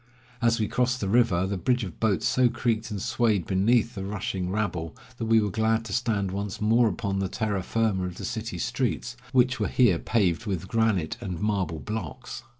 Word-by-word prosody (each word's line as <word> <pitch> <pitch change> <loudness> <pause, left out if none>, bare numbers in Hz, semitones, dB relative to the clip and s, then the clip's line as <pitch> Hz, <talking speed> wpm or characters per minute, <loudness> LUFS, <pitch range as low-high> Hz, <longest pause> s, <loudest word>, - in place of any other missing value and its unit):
As 115 0 +3
we 110 - +1
crossed 125 +2 0
the 100 - -2
river, 100 -4 +3
the 95 -1 -2
bridge 125 +5 +1
of 90 -5 -7
boats 110 -4 +1
so 125 -1 +3
creaked 115 -2 -1
and 105 -2 -4
swayed 105 -3 +1
beneath 110 +4 +2
the 95 - -5
rushing 100 -2 -3
rabble, 90 -6 -2 0.2
that 115 - -3
we 115 0 +5
were 105 -2 0
glad 110 +1 +1
to 100 - -5
stand 110 -6 0
once 100 0 -4
more 115 +3 +4
upon 100 0 -2
the 95 -1 -1
terra 105 -2 -1
firma 105 -2 0
of 90 - -7
the - - -5
city 115 -5 -4
streets, - - -2 0.2
which 130 0 +3
were - - +1
here 105 -10 +3
paved 100 -4 +1
with 95 -2 -2
granite 110 -7 +1
and 90 -3 -4
marble 95 -6 -1
blocks. 85 - -6
105 Hz, 200 wpm, -26 LUFS, 95-115 Hz, 0.2 s, we